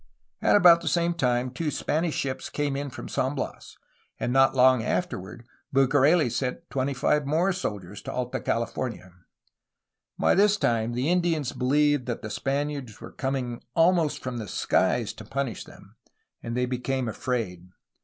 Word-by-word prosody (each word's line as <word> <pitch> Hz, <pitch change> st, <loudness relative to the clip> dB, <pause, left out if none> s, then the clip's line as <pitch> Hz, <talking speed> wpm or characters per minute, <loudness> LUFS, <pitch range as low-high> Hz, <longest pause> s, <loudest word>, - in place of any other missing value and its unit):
At -, -, +4 dB
about 175 Hz, -4 st, +7 dB
the -, -, -6 dB
same 170 Hz, 0 st, +2 dB
time 125 Hz, -5 st, 0 dB
two 150 Hz, +5 st, -2 dB
Spanish 155 Hz, +2 st, -1 dB
ships 130 Hz, -1 st, -3 dB
came 145 Hz, -2 st, -2 dB
in 140 Hz, +1 st, -3 dB
from -, -, -8 dB
San 130 Hz, +3 st, -1 dB
Bias, 135 Hz, -, -6 dB, 0.4 s
and 120 Hz, -, -1 dB
not 135 Hz, 0 st, +4 dB
long 130 Hz, -1 st, +5 dB
afterward 115 Hz, -, -3 dB, 0.3 s
Bucareli 140 Hz, +4 st, +4 dB
sent 135 Hz, +8 st, -3 dB
twenty 135 Hz, +1 st, -1 dB
five 145 Hz, +2 st, +1 dB
more 170 Hz, +6 st, +2 dB
soldiers 105 Hz, -, -5 dB
to -, -, -6 dB
Alta 125 Hz, -1 st, -3 dB
California. 115 Hz, -5 st, -3 dB, 1.0 s
By -, -, +3 dB
this 205 Hz, +2 st, +4 dB
time 115 Hz, -, 0 dB
the 130 Hz, +7 st, 0 dB
Indians 170 Hz, -6 st, +1 dB
believed 145 Hz, +1 st, +2 dB
that 120 Hz, -1 st, -4 dB
the 110 Hz, -, -5 dB
Spaniards 140 Hz, -1 st, -3 dB
were -, -, -10 dB
coming 130 Hz, -3 st, -3 dB
almost 165 Hz, -2 st, +3 dB
from 130 Hz, -2 st, -4 dB
the 110 Hz, -3 st, -5 dB
skies -, -, +1 dB
to -, -, -11 dB
punish 135 Hz, -4 st, -3 dB
them, -, -, -16 dB, 0.4 s
and 115 Hz, +1 st, -4 dB
they 125 Hz, -, +2 dB
became 130 Hz, 0 st, -2 dB
afraid. 110 Hz, -7 st, -3 dB
135 Hz, 160 wpm, -26 LUFS, 120-150 Hz, 1.0 s, about